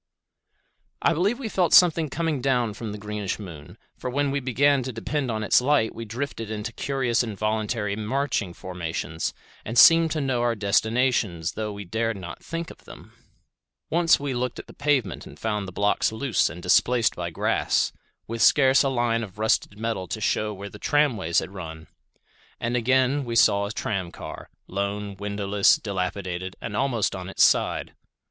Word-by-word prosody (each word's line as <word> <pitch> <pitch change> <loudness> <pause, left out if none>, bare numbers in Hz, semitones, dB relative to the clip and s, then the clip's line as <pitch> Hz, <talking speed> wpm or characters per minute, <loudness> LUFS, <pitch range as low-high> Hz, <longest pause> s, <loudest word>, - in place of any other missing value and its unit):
I - - +4
believe 195 +9 +1
we 260 -4 -5
felt 185 -5 +1
something 165 -3 +5
coming 160 -2 -1
down 125 -4 +1
from 110 +1 -6
the 105 - -6
greenish 105 -1 -4
moon, 85 -8 -10 0.2
for 125 - -5
when 140 +2 0
we 140 - 0
began 140 +2 +2
to 130 +1 -4
depend 130 +4 -3
on 110 -1 -2
its 105 - +4
light 130 -4 +2
we 115 - -7
drifted 115 -1 -5
into 110 +1 -4
curious 130 -4 0
involuntary 110 -1 -2 0.6
formations 85 -3 -4 0.3
and 115 +3 -4
seemed 165 +5 +8
to 155 - -2
know 130 -4 0
our 120 -1 +1
destinations 105 -4 +1
though 110 -1 -4
we 100 0 -7
dared 110 +3 -1
not 90 -2 -9
think 165 0 -5
of - - -17
them. - - -13 0.8
Once 170 0 +4
we 140 -1 -3
looked 125 0 -2
at - - -8
the - - -14
pavement 140 -8 0
and - - -13
found 105 -3 -2
the - - -7
blocks 100 +4 +1
loose 110 -2 +1
and 85 +1 -9
displaced 120 +6 +3
by 85 -1 -3
grass, 80 - 0 0.3
with 115 0 -5
scarce 135 -2 +5
a 135 - +2
line 120 -3 +1
of 100 -3 -8
rusted 110 -1 0
metal 110 -4 -3
to 110 - -4
shew 105 0 0
where 100 0 -7
the 105 - -11
tramways 115 - +1
had 90 +5 0
run. 80 -4 -8 0.7
And 120 +1 -1
again 130 +3 +2
we 120 -2 -4
saw 100 -2 +4
a - - -5
tram 95 -5 -3
car, - - -9 0.2
lone, 100 +1 -3
windowless, 100 0 +2
dilapidated, 95 -2 -4
and 105 - -5
almost 120 -5 0
on 95 0 -6
its - - +3
side. - - +2
110 Hz, 175 wpm, -25 LUFS, 100-130 Hz, 0.8 s, seemed